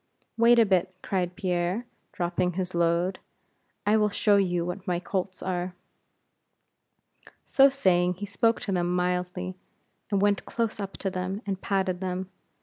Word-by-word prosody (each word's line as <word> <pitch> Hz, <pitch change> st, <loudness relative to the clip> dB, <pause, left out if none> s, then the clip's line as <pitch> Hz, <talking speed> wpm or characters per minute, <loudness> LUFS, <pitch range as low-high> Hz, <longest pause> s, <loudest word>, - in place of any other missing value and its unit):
"Wait 235 Hz, +1 st, +5 dB
a 230 Hz, -, +6 dB
bit," 185 Hz, -2 st, +1 dB
cried 180 Hz, -2 st, -1 dB
Pierre, 180 Hz, +5 st, -1 dB, 0.3 s
dropping 180 Hz, 0 st, -1 dB
his 185 Hz, 0 st, -3 dB
load; 170 Hz, +2 st, +1 dB, 0.7 s
"I 210 Hz, +2 st, +4 dB
will 210 Hz, -1 st, +3 dB
show 205 Hz, 0 st, +3 dB
you 175 Hz, -3 st, +1 dB
what 180 Hz, +3 st, -5 dB
my 175 Hz, -1 st, +1 dB
colts 185 Hz, 0 st, -3 dB
are." 180 Hz, -1 st, -2 dB, 1.7 s
So 275 Hz, 0 st, +6 dB
saying, 180 Hz, -9 st, +2 dB
he 205 Hz, +3 st, -5 dB
spoke 225 Hz, +3 st, +1 dB
to 200 Hz, -, -3 dB
them 175 Hz, -1 st, 0 dB
mildly, 180 Hz, +1 st, -1 dB, 0.6 s
and 200 Hz, -2 st, +1 dB
went 205 Hz, 0 st, +2 dB
close 230 Hz, -2 st, -2 dB
up 195 Hz, -1 st, -4 dB
to 195 Hz, -, -3 dB
them, 185 Hz, +3 st, -3 dB
and 195 Hz, -2 st, -3 dB
patted 190 Hz, -2 st, 0 dB
them. 185 Hz, 0 st, -3 dB
185 Hz, 150 wpm, -27 LUFS, 180-200 Hz, 1.7 s, a